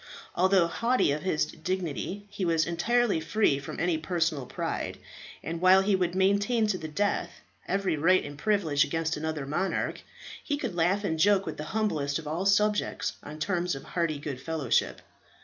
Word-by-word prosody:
Although 185 0 +4
haughty 230 - +1
of 150 +1 -2
his 155 -4 +1
dignity, 185 +3 -4
he 205 -1 -4
was 165 -3 +2
entirely 230 +4 +1
free 160 -3 +1
from 140 - -7
any 165 -2 +1
personal 160 -5 -1
pride, - - -3 0.5
and 165 +1 -4
while 185 +1 +7
he 200 0 +3
would 180 -1 0
maintain 200 +5 +2
to 185 - -4
the 160 - -5
death 175 +2 -1 0.4
every 195 -3 0
right 185 +5 +3
and 145 0 -7
privilege 165 -6 +2
against 165 0 -1
another 155 -2 -3
monarch, 175 +7 -2 0.4
he 290 - -1
could 245 -9 -3
laugh 180 +4 +1
and 160 -5 -1
joke 200 +2 +4
with - - -5
the 150 - -5
humblest 150 -10 0
of 165 - -8
his 170 +6 +1
subjects 210 0 0
on 150 +1 -9
terms 175 0 -1
of 135 - -8
hearty 165 -4 -1
good 140 -3 -6
fellowship. 155 -4 0
175 Hz, 175 wpm, -28 LUFS, 155-195 Hz, 0.5 s, while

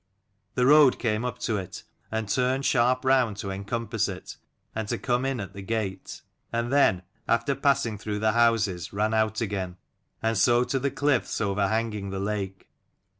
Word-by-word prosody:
The 125 - +2
road 145 -1 +7
came 110 -1 -1
up 125 - -3
to 110 - 0
it, 95 -2 -7 0.3
and 110 -1 -2
turned 130 +5 +1
sharp 125 +1 +2
round 130 -6 +3
to 100 -1 -4
encompass 105 +4 -2
it - - -7 0.4
and 110 -1 -3
to - - -1
come 125 +1 0
in 135 -2 -1
at 100 -2 -6
the 100 - -8
gate; 100 -1 -4 0.3
and 115 +2 -1
then, 95 -11 +4 0.2
after 115 +4 +2
passing 135 -6 +1
through 105 0 -3
the 110 +1 +2
houses, 105 -7 +2
ran 105 +2 0
out 110 0 +1
again; 95 -4 -3 0.5
and 115 -2 +1
so 120 +5 +4
to 135 +1 -1
the 140 +2 0
cliffs 140 -3 0
over 100 -1 +1
hanging 110 -2 -2
the 95 0 -4
lake. 100 -2 -4
110 Hz, 175 wpm, -26 LUFS, 100-125 Hz, 0.5 s, road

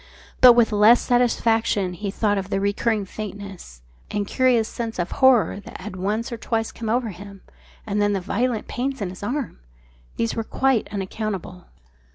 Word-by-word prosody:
But 250 -1 +10
with 235 -1 +3
less 215 +3 +6
satisfaction 225 -5 +1
he 200 +3 -4
thought 205 0 0
of 195 0 -6
the 195 - 0
recurring 205 +1 0
faintness, 195 - -8 0.3
and 205 -1 -2
curious 245 -1 +2
sense 230 -1 -5
of 175 0 -2
horror 260 -6 +4
that 200 - -11
had 190 +1 -7
once 210 +6 -2
or 235 - -4
twice 225 0 -2
come 225 -2 -6
over 235 0 0
him, 200 +1 -11 0.4
and 210 -1 -1
then 205 0 +2
of 190 - -3
the - - -18
violent 240 0 0
pains 265 +2 -3
in 200 -4 -3
his 185 - -10
arm. 250 +4 -3 0.6
These 230 - 0
were 225 - -2
quite 260 0 0
unaccountable. 195 -2 -5
215 Hz, 180 wpm, -23 LUFS, 200-235 Hz, 0.6 s, But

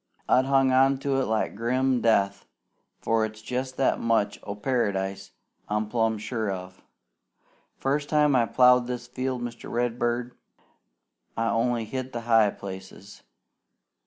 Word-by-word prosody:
I've 130 - +4
hung 135 -1 +3
on 135 +1 +4
to 135 -1 0
it - - 0
like 110 0 -1
grim 125 +3 0
death, 100 -3 +1 0.5
for 115 -1 +1
it's 110 0 -4
jest 130 +3 -4
that 135 - +2
much 115 -3 +1
o' 100 - -6
Paradise 100 -5 -1 0.4
I'm 105 0 -1
plumb 115 -1 +1
sure 110 0 -3
of. 90 -1 -7 1.0
First 145 +2 -1
time 150 -2 +3
I 120 -2 +3
plowed 125 0 +5
this 125 -1 -4
field, 130 0 -3
Mr. 120 0 -7
Redbird, 120 0 -1 1.0
I 115 0 +1
only 115 0 0
hit 130 +2 -5
the 120 - -3
high 115 -2 +4
places. 95 0 -10
120 Hz, 140 wpm, -26 LUFS, 110-130 Hz, 1.0 s, plowed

